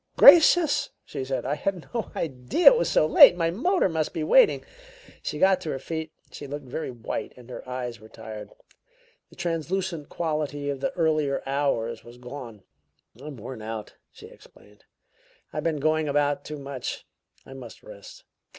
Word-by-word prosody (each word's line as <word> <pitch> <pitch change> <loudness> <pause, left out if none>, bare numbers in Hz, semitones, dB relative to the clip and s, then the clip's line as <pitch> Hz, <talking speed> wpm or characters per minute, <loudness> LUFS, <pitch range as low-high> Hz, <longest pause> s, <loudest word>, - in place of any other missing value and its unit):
"Gracious!" 335 -2 +7 0.2
she - - -5
said. 130 0 -3
"I 135 - 0
had 175 +3 -3
no 230 -3 -3
idea 135 - +4
it - - +3
was 480 - 0
so - - +3
late! 155 - +8
My 165 -1 +1
motor 350 - +1
must 160 -3 -2
be 160 - -2
waiting." 470 - +4 0.6
She - - -4
got 190 +2 +3
to 165 - -5
her 135 - -2
feet. 160 +3 -5 0.2
She 145 - -9
looked 145 0 -6
very 130 +5 -5
white 120 +3 -5
and 125 0 -13
her 125 - -9
eyes 125 -2 -5
were 110 - -15
tired; 110 -2 -9 0.8
the - - -18
translucent 170 -1 -3
quality 150 -3 -2
of 140 - -5
the 140 - -1
earlier 155 -4 0
hours 135 -5 -1
was 120 +1 -14
gone. 125 -4 -9 0.6
"I'm 150 -3 -8
worn 115 +1 -8
out," 110 0 -6 0.2
she - - -14
explained. 105 0 -19 0.7
"I've - - -3
been 160 -3 -1
going 155 +1 +1
about 145 0 0
too 150 - -6
much. 140 -2 -6 0.4
I 135 - -11
must 125 -4 -11
rest." 100 -1 -13
145 Hz, 170 wpm, -25 LUFS, 125-165 Hz, 0.8 s, late